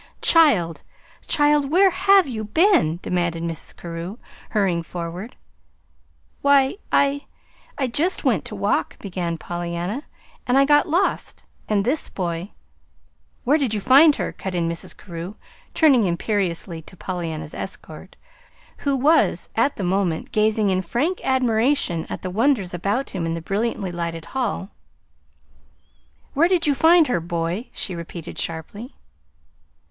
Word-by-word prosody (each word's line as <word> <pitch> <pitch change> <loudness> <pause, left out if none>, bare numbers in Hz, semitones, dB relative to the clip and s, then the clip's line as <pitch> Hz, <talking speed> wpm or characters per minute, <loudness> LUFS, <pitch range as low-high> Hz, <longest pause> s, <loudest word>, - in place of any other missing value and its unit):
"Child, 205 - +4 0.5
child, 295 -1 +3
where 375 +5 +5
HAVE 390 +1 +5
you 230 -6 -4
been?" 295 - +3
demanded 175 -2 -1
Mrs. 165 -2 -5
Carew, 170 +4 -7 0.3
hurrying 190 -6 +1
forward. 175 +6 -7 1.1
"Why, 280 +3 +4
I 280 0 +2 0.5
I 275 - 0
just 305 +10 -1
went - - +2
to - - -5
walk," - - -1
began 175 -4 -4
Pollyanna, 175 - -4 0.5
"and 250 +2 +3
I 275 - +6
got 290 +1 +4
lost, 355 +5 -1 0.2
and 205 -2 +1
this 275 +5 -1
boy 175 0 -4 0.5
" - - -40
"Where 290 +5 +3
did 250 -7 0
you - - -1
find 280 +8 +6
her?" - - -3
cut 190 -1 -6
in 170 -1 0
Mrs. 165 0 -5
Carew, 175 +2 -8 0.4
turning 275 -9 +5
imperiously 175 -2 -2
to 180 - -15
Pollyanna's 160 -5 -5
escort, - - -8 0.6
who 280 -1 0
was, 300 +5 +2
at 285 - +2
the 200 - -4
moment, 180 -3 -1
gazing 215 -1 +2
in 185 0 +1
frank 275 - -1
admiration 245 - +1
at - - -6
the 185 - -3
wonders 215 -3 +1
about 200 +9 -1
him 170 -4 -3
in 165 - -1
the - - -4
brilliantly 200 +2 -2
lighted 170 -1 -4
hall. 235 -6 -2 1.6
"Where 315 +4 +4
did 355 -2 +1
you 290 - +3
find 325 +3 +5
her, 245 -10 0
boy?" 170 +6 -3
she 185 - -4
repeated 170 -1 -7
sharply. 200 - -5
205 Hz, 140 wpm, -22 LUFS, 170-280 Hz, 1.6 s, I